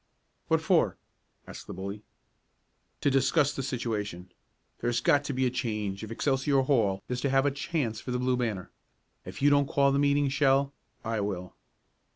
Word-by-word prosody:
"What - - +2
for?" - - +2 0.5
asked - - -10
the - - -7
bully. 100 +2 -6 1.0
"To 140 - +2
discuss 140 +2 +3
the - - -2
situation. 105 -8 -4 0.5
There - - -3
has 120 0 +1
got 145 +3 +3
to 145 - -2
be 130 0 +1
a 125 - +1
change 105 -5 -3
if 110 - -6
Excelsior 135 +3 +1
Hall 110 -8 +1
is 125 0 -3
to 140 - 0
have 135 +1 +3
a 145 - +3
chance 140 -6 -2
for - - -8
the 125 - 0
Blue 125 0 +1
Banner. 110 -7 -3 0.5
If - - -7
you 145 - +6
don't 140 -1 +3
call 140 -1 +3
the 140 - +2
meeting, 145 0 +3
Shell, 140 0 +2 0.3
I 115 -1 -1
will." 95 -3 -4
130 Hz, 185 wpm, -28 LUFS, 110-140 Hz, 1.0 s, you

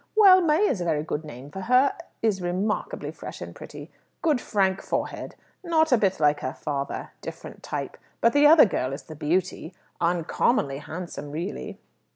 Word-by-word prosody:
Well, 385 -4 +8
May 335 +5 +3
is 185 - -1
a - - -2
very 155 -3 0
good 155 0 -3
name 140 -1 -10
for 190 - -6
her 255 +6 +3 0.3
is 210 -4 +1
remarkably 200 - -2
fresh - - -9
and - - -7
pretty. - - -10 0.3
Good 300 -7 +2
frank 195 -2 +1
forehead. - - -4 0.3
Not 320 -3 +2
a 250 - +6
bit 195 -3 +1
like 150 -1 +3
her 130 - -4
father. 140 -2 -4
Different - - -9
type. - - -5 0.2
But 230 - +3
the 290 +1 +6
other 310 -2 +8
girl 130 - -2
is 140 - -6
the 155 - -10
beauty. 170 +3 -2 0.2
Uncommonly 170 - +1
handsome, 160 -1 -7
really." 165 +7 -5
185 Hz, 175 wpm, -25 LUFS, 155-255 Hz, 0.3 s, Well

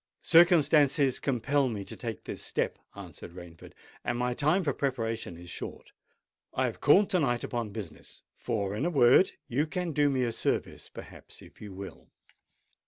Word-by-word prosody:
"Circumstances 150 -5 +4
compel 135 +1 +1
me 105 -4 -5
to - - -7
take 115 -4 -6
this - - -7
step," - - -2 0.2
answered 90 -3 -10
Rainford; 85 -2 -12 0.3
"and 120 - -2
my 125 0 0
time 155 +9 +1
for 140 -4 0
preparation 115 -9 -3
is 90 +1 -12
short. - - -7 0.6
I - - +1
have - - -4
called 205 +1 +5
to 185 - +3
night 120 -6 0
upon 120 -3 -3
business—for, 100 +1 -6
in 110 - -2
a 175 - +1
word, 140 +3 +5
you 145 +6 0
can 180 +1 -3
do 145 -1 +2
me 130 -2 0
a 120 - 0
service, 115 - -2
perhaps, - - -12
if - - -17
you 105 -2 -8
will." 95 +1 -10
125 Hz, 170 wpm, -29 LUFS, 105-145 Hz, 0.6 s, called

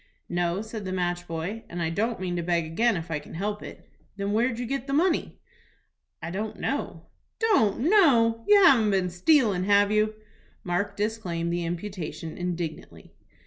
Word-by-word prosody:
"No," 175 +3 -1
said 220 -1 -7
the 185 - -4
match 175 -1 -2
boy, 170 +7 -4
"and 175 - -6
I 165 -1 -1
don't 220 +5 -1
mean 180 -1 -3
to 175 - -1
beg 170 -1 0
again 210 +7 +1
if 165 0 -6
I 150 - -1
can 150 - -12
help 205 +4 -3
it." - - -11 0.3
"Then 200 0 -2
where'd 230 +2 +1
you 245 - -3
get 270 +2 -3
the 275 - -2
money?" 330 +3 +1 0.9
"I 165 - -4
don't 210 +4 -4
know." - - -3 0.3
"Don't 380 - +2
know! 250 - +4
You 410 -1 +7
haven't 240 - +6
been 190 -3 +1
stealin', 195 - +3
have 205 0 +4
you?" 215 0 +1 0.5
Mark 200 +3 -2
disclaimed 185 -6 -2
the 175 0 -1
imputation 170 -2 -5
indignantly. 175 -3 -5
200 Hz, 175 wpm, -26 LUFS, 175-230 Hz, 0.9 s, You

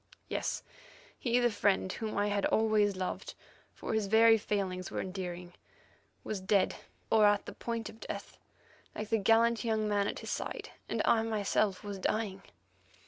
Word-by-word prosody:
Yes; - - -2 0.6
he, 240 -1 +1
the 240 -1 +3
friend 200 -2 +1
whom 220 -2 -4
I 205 0 +2
had 200 -1 +1
always 215 -2 +3
loved, 185 0 -4 0.4
for - - -4
his 220 -2 +1
very 225 +2 +7
failings 195 -4 -2
were - - -3
endearing, 180 -2 -5 0.7
was 205 -3 -4
dead 195 0 +2 0.4
or 215 -2 +6
at 205 0 +2
the - - -7
point 230 -2 -4
of 220 - -11
death, - - -7 0.6
like 215 0 -5
the 225 - +2
gallant 225 +3 +4
young 220 -2 0
man 205 -1 +1
at - - -3
his - - -6
side, - - -4 0.2
and - - 0
I 225 - +4
myself 215 -2 0
was 200 -2 -5
dying. 195 -1 -1
210 Hz, 165 wpm, -32 LUFS, 195-225 Hz, 0.7 s, very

